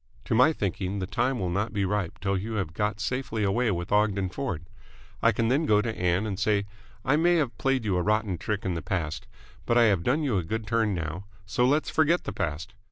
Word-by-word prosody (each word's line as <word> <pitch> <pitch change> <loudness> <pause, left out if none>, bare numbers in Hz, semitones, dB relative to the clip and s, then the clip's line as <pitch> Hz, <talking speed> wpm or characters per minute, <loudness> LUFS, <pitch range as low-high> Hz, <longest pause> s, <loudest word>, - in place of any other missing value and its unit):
To - - -1
my 125 +7 +6
thinking, 100 - -2
the 95 - -2
time 125 +7 0
will 90 -6 -2
not 100 +5 -1
be 100 -2 0
ripe 100 -3 -2
till 100 0 0
you 105 +4 -3
have 95 -7 -2
got 105 +3 -1
safely 120 -2 -2
away 115 +5 +2
with 90 -3 -3
Ogden 100 -2 +2
Ford. 90 - -4 0.6
I 115 - +5
can 115 +1 0
then 145 +5 +2
go 105 -1 +5
to 110 +1 -2
Ann 90 +3 +1
and 100 -3 -3
say 105 -1 +2 0.4
'I 135 +4 +3
may 175 +2 +4
have 140 -9 0
played 135 0 +1
you 100 -3 +1
a - - +1
rotten 105 -2 0
trick 105 +1 -3
in 95 - 0
the 85 - -3
past, 80 -2 -3 0.4
but 120 - +3
I 120 - +6
have 100 -6 +3
done 135 - +1
you 120 -9 +1
a - - -3
good 110 +6 -3
turn 110 -3 +1
now, 85 +3 -4 0.2
so 125 +4 +1
let's 150 +4 +1
forget 160 +2 +3
the - - -5
past!' 80 +8 -3
105 Hz, 235 wpm, -27 LUFS, 95-120 Hz, 0.6 s, my